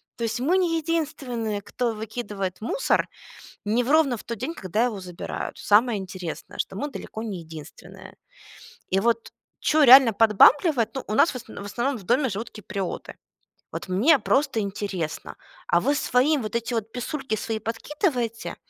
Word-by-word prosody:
То 235 Hz, -, -5 dB
есть 225 Hz, 0 st, -1 dB
мы 320 Hz, +9 st, +2 dB
не 345 Hz, -3 st, +1 dB
единственные, 270 Hz, -10 st, -2 dB
кто 240 Hz, +3 st, -2 dB
выкидывает 210 Hz, -4 st, -5 dB
мусор -, -, 0 dB, 0.6 s
не 225 Hz, +4 st, +2 dB
в 245 Hz, -, -4 dB
ровно 305 Hz, -6 st, +4 dB
в -, -, -10 dB
тот 235 Hz, -, -5 dB
день, 325 Hz, +11 st, -4 dB
когда 210 Hz, -, -1 dB
его 225 Hz, -5 st, -3 dB
забирают. 180 Hz, -2 st, -6 dB
Самое 220 Hz, +2 st, +3 dB
интересное, 185 Hz, -3 st, -7 dB
что -, -, -2 dB
мы 290 Hz, +9 st, -3 dB
далеко 220 Hz, -, -7 dB
не 200 Hz, -6 st, -4 dB
единственные. 160 Hz, -2 st, -11 dB, 0.7 s
И 190 Hz, -, +2 dB
вот 230 Hz, +2 st, 0 dB, 0.3 s
чё 310 Hz, 0 st, +3 dB
реально 260 Hz, -2 st, +9 dB
подбамбливать, 230 Hz, -, +5 dB
ну 235 Hz, -5 st, -3 dB
нас 335 Hz, -, +5 dB
в -, -, -11 dB
осн 230 Hz, -2 st, -10 dB
в 200 Hz, -, -7 dB
основном 245 Hz, +6 st, -2 dB
в 200 Hz, -, -12 dB
доме 260 Hz, +7 st, +2 dB
живут 220 Hz, +3 st, -5 dB
киприоты. 195 Hz, -2 st, -5 dB, 0.6 s
Вот -, -, -6 dB
мне 260 Hz, -, +5 dB
просто 275 Hz, -2 st, +1 dB
интересно. 195 Hz, -5 st, -4 dB, 0.3 s
А 170 Hz, -, +4 dB
вы 285 Hz, +3 st, +2 dB
своим, 280 Hz, +1 st, +2 dB
вот 215 Hz, +1 st, -5 dB
эти 235 Hz, +1 st, -2 dB
вот 225 Hz, -1 st, -2 dB
писульки 255 Hz, -1 st, -3 dB
свои, 220 Hz, +1 st, -3 dB
подкидываете, 230 Hz, -, -2 dB
230 Hz, 165 wpm, -25 LUFS, 205-270 Hz, 0.7 s, реально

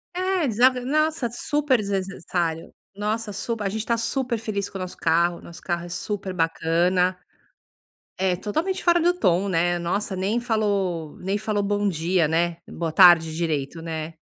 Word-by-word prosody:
É, 370 Hz, -3 st, 0 dB
desa 240 Hz, +2 st, +5 dB
não, 265 Hz, +5 st, +1 dB
nossa, 310 Hz, -6 st, -2 dB
super 285 Hz, +2 st, +1 dB
desnecessário. 185 Hz, -5 st, -3 dB, 0.2 s
Nossa, 210 Hz, +1 st, -2 dB
sup 225 Hz, +2 st, -4 dB
a 200 Hz, -, 0 dB
gente 215 Hz, +2 st, -3 dB
está 230 Hz, +1 st, 0 dB
super 235 Hz, +1 st, -1 dB
feliz 200 Hz, -2 st, -3 dB
com 195 Hz, -, -7 dB
o -, -, -6 dB
nosso 185 Hz, -, -6 dB
carro, 170 Hz, +1 st, +1 dB
nosso 170 Hz, -, -12 dB
carro 175 Hz, -1 st, -3 dB
é -, -, -9 dB
super 190 Hz, +2 st, -4 dB
bacana. 175 Hz, +2 st, +1 dB, 1.0 s
É 185 Hz, -1 st, +1 dB
totalmente 315 Hz, -, -2 dB
fora 345 Hz, -1 st, +4 dB
do 350 Hz, +2 st, +3 dB
tom 190 Hz, -, +2 dB
né, 175 Hz, 0 st, +1 dB
nossa 190 Hz, +4 st, -2 dB
nem 195 Hz, +5 st, 0 dB
falou 200 Hz, -9 st, -1 dB
nem 195 Hz, +3 st, -1 dB
falou 215 Hz, -1 st, -1 dB
bom 205 Hz, 0 st, 0 dB
dia, 170 Hz, -1 st, +1 dB
né, 170 Hz, +1 st, 0 dB
boa 165 Hz, -2 st, -4 dB
tarde 165 Hz, -3 st, +7 dB
direito, 160 Hz, -1 st, -2 dB
né. 160 Hz, -1 st, -5 dB
195 Hz, 170 wpm, -24 LUFS, 170-225 Hz, 1.0 s, tarde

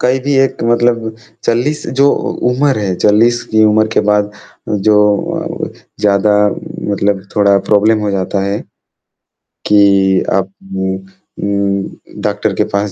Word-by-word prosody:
कई 125 Hz, +1 st, +2 dB
भी 145 Hz, -, +1 dB
एक 135 Hz, -2 st, +1 dB
मतलब 115 Hz, -1 st, +1 dB, 0.3 s
40 130 Hz, +6 st, 0 dB
जो 140 Hz, -, +6 dB
उ -, -, -2 dB, 0.2 s
उम्र 135 Hz, +2 st, +1 dB
है 95 Hz, -3 st, -1 dB
40 115 Hz, +3 st, +3 dB
की 110 Hz, 0 st, +4 dB
उम्र 110 Hz, 0 st, +3 dB
के -, -, +4 dB
बाद 105 Hz, 0 st, +1 dB, 0.6 s
जो 105 Hz, -, +5 dB, 0.7 s
अ, -, -, -8 dB, 0.3 s
ज़्यादा 105 Hz, 0 st, +2 dB, 0.6 s
मतलब 100 Hz, -1 st, 0 dB
थोड़ा 100 Hz, -1 st, +4 dB
प्रॉब्लम 110 Hz, +1 st, +4 dB
हो 100 Hz, -, 0 dB
जाता 95 Hz, 0 st, -2 dB
है, 100 Hz, +1 st, -2 dB, 1.1 s
कि 100 Hz, -2 st, +4 dB
आप 95 Hz, 0 st, 0 dB, 0.3 s
उम 95 Hz, 0 st, -2 dB
उम, 100 Hz, +1 st, -5 dB
डॉक्टर -, -, -1 dB
के -, -, +1 dB
पास 100 Hz, 0 st, -1 dB
105 Hz, 140 wpm, -14 LUFS, 100-115 Hz, 1.1 s, जो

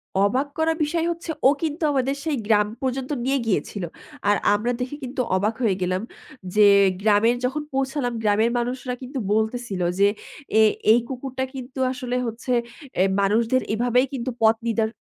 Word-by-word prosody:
অবাক 205 Hz, +9 st, +2 dB
করা 320 Hz, 0 st, +2 dB
বিষয় 330 Hz, +2 st, 0 dB
হচ্ছে, 335 Hz, 0 st, -7 dB, 0.2 s
ও -, -, +7 dB
কিন্তু 315 Hz, +1 st, -2 dB
আমাদের 270 Hz, 0 st, 0 dB
সেই 305 Hz, -4 st, 0 dB
গ্রাম 210 Hz, -2 st, +4 dB
পর্যন্ত 265 Hz, +1 st, -2 dB
নিয়ে 275 Hz, +1 st, +2 dB
গিয়েছিল। 190 Hz, +1 st, -1 dB, 0.5 s
আর 205 Hz, -, +5 dB, 0.2 s
আমরা 220 Hz, +4 st, 0 dB
দেখে 255 Hz, +3 st, -3 dB
কিন্তু 255 Hz, +1 st, -3 dB
অবাক 210 Hz, +4 st, +1 dB
হয়ে 205 Hz, -5 st, +2 dB
গেলাম, 185 Hz, +1 st, 0 dB, 0.5 s
যে 210 Hz, -1 st, +7 dB, 0.3 s
গ্রামের 220 Hz, +3 st, +4 dB
যখন 295 Hz, +4 st, -1 dB
পৌঁছালাম 270 Hz, -2 st, -1 dB
গ্রামের 215 Hz, +3 st, +3 dB
মানুষরা 250 Hz, +1 st, -3 dB
কিন্তু 260 Hz, +1 st, -5 dB
বলতেছিল 220 Hz, -3 st, -1 dB, 0.2 s
যে 200 Hz, -, +6 dB, 0.5 s
এ -, -, +7 dB, 0.3 s
এই 235 Hz, -, +6 dB
কুকুরটা 260 Hz, 0 st, -4 dB
কিন্তু 260 Hz, +1 st, -7 dB
আসলে 250 Hz, -1 st, -4 dB
হচ্ছে 230 Hz, +3 st, -3 dB, 0.4 s
এ্যা 185 Hz, -, +4 dB, 0.2 s
মানুষদের 230 Hz, +5 st, +2 dB
এভাবেই 245 Hz, +3 st, +2 dB
কিন্তু 260 Hz, -1 st, -3 dB
পথ 220 Hz, 0 st, +5 dB
নিদার 225 Hz, -1 st, +1 dB
245 Hz, 160 wpm, -23 LUFS, 220-265 Hz, 0.5 s, ও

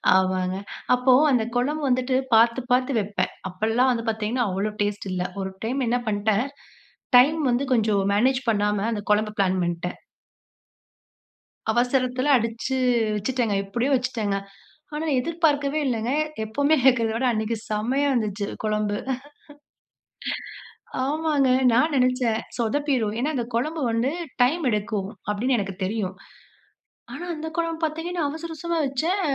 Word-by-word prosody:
ஆமாங்க. 185 Hz, 0 st, +1 dB, 0.4 s
அப்போ 250 Hz, +1 st, +4 dB, 0.2 s
அந்த 245 Hz, -4 st, +3 dB
குழம்பு 290 Hz, +6 st, 0 dB
வந்துட்டு 255 Hz, 0 st, +1 dB, 0.2 s
பார்த்து 230 Hz, +2 st, +5 dB
பார்த்து 255 Hz, +1 st, +2 dB
வைப்பேன். 205 Hz, 0 st, -2 dB, 0.2 s
அப்போலாம் 225 Hz, +7 st, +1 dB
வந்து 230 Hz, -2 st, -1 dB
பார்த்தீங்கன்னா, 225 Hz, +3 st, -1 dB
அவ்வளோ 195 Hz, +3 st, -1 dB
டேஸ்ட் 205 Hz, -1 st, -2 dB
இல்ல. 180 Hz, -1 st, -1 dB, 0.2 s
ஒரு 190 Hz, -, -3 dB, 0.2 s
டைம் 255 Hz, +4 st, -1 dB
என்ன 245 Hz, +2 st, +2 dB
பண்ணிட்டேன், 215 Hz, +2 st, +1 dB, 0.7 s
டைம் 295 Hz, +6 st, +5 dB
வந்து 245 Hz, +3 st, +1 dB
கொஞ்சம் 215 Hz, -4 st, +2 dB
மேனேஜ் 255 Hz, +5 st, +2 dB
பண்ணாம 210 Hz, -1 st, +1 dB
அந்த 210 Hz, -2 st, -3 dB
குழம்பு 210 Hz, 0 st, +2 dB
பிளான் 190 Hz, -1 st, +2 dB
பண்ணிட்டேன். 175 Hz, +1 st, -3 dB, 1.8 s
அவசரத்தில 255 Hz, +2 st, +1 dB
அடிச்சு 230 Hz, +3 st, -2 dB, 0.4 s
வச்சுட்டேங்க 230 Hz, 0 st, 0 dB
எப்படியோ 235 Hz, +7 st, -1 dB
வச்சுட்டேங்க. 240 Hz, -6 st, -1 dB, 0.6 s
ஆனா 310 Hz, +2 st, -2 dB
எதிர்பார்க்கவே 300 Hz, -1 st, +1 dB
இல்லங்க, 235 Hz, -2 st, -1 dB, 0.3 s
எப்பவுமே 285 Hz, +8 st, +2 dB
வெக்கிறத 240 Hz, -4 st, +4 dB
விட 235 Hz, +3 st, -1 dB
அன்னைக்கு 220 Hz, +1 st, -1 dB
செமையா 245 Hz, +7 st, 0 dB
வந்துச்சு 210 Hz, -4 st, -1 dB, 0.2 s
குழம்பு. 210 Hz, -1 st, 0 dB, 2.1 s
ஆமாங்க, 295 Hz, -2 st, +1 dB, 0.2 s
நான் 290 Hz, +7 st, +3 dB
நினைச்சேன் 250 Hz, -3 st, +2 dB, 0.2 s
சொதப்பிரும். 240 Hz, -2 st, 0 dB
ஏன்னா, 275 Hz, +6 st, 0 dB
அந்த 245 Hz, -3 st, -1 dB
குழம்பு 310 Hz, +7 st, -1 dB
வந்து 230 Hz, +4 st, +1 dB, 0.3 s
டைம் 305 Hz, +7 st, +2 dB
எடுக்கும். 210 Hz, -2 st, -2 dB, 0.2 s
அப்படின்னு 235 Hz, +5 st, +1 dB
எனக்கு 195 Hz, -2 st, -3 dB
தெரியும். 195 Hz, -1 st, -2 dB, 1.0 s
ஆனா 350 Hz, -, -6 dB
அந்த 315 Hz, +1 st, -5 dB
குழம்பு 330 Hz, -1 st, -1 dB
பார்த்தீங்கன்னா, 330 Hz, +3 st, -3 dB
அவசர 320 Hz, +3 st, -6 dB
அவசரமா 335 Hz, +1 st, -2 dB
வச்சேன். 320 Hz, +9 st, 0 dB
240 Hz, 125 wpm, -24 LUFS, 210-270 Hz, 2.1 s, பார்த்து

